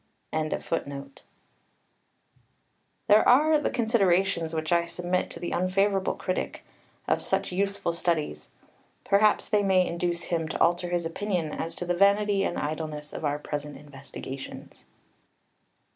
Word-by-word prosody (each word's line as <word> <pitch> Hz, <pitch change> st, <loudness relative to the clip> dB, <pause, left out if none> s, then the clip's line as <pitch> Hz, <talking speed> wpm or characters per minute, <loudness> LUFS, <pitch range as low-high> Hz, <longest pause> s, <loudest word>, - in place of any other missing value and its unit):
] -, -, -33 dB
These 155 Hz, 0 st, -1 dB, 2.5 s
are 270 Hz, +9 st, +6 dB
the 295 Hz, -, 0 dB
considerations 195 Hz, -8 st, +2 dB
which 155 Hz, +1 st, -2 dB
I 170 Hz, 0 st, +3 dB
submit 180 Hz, +1 st, -2 dB
to -, -, -9 dB
the 175 Hz, -, -4 dB
unfavourable 195 Hz, +1 st, +1 dB
critic 185 Hz, -, -3 dB, 0.4 s
of -, -, +1 dB
such 195 Hz, 0 st, -1 dB
useful 195 Hz, -2 st, -1 dB
studies. 160 Hz, -, -2 dB, 0.5 s
Perhaps 205 Hz, +1 st, +3 dB
they 210 Hz, -, +3 dB
may 190 Hz, -2 st, +3 dB
induce 170 Hz, 0 st, -2 dB
him 165 Hz, -2 st, -1 dB
to -, -, -4 dB
alter 175 Hz, +1 st, +2 dB
his 175 Hz, -1 st, -1 dB
opinion 170 Hz, -2 st, -2 dB
as 165 Hz, +1 st, -4 dB
to 180 Hz, -, -4 dB
the 175 Hz, -, 0 dB
vanity 200 Hz, +2 st, +3 dB
and 175 Hz, -, -1 dB
idleness 150 Hz, 0 st, -4 dB
of -, -, -6 dB
our 145 Hz, -1 st, 0 dB
present 150 Hz, -1 st, -5 dB
investigations. 135 Hz, -1 st, -9 dB
175 Hz, 130 wpm, -27 LUFS, 160-195 Hz, 2.5 s, are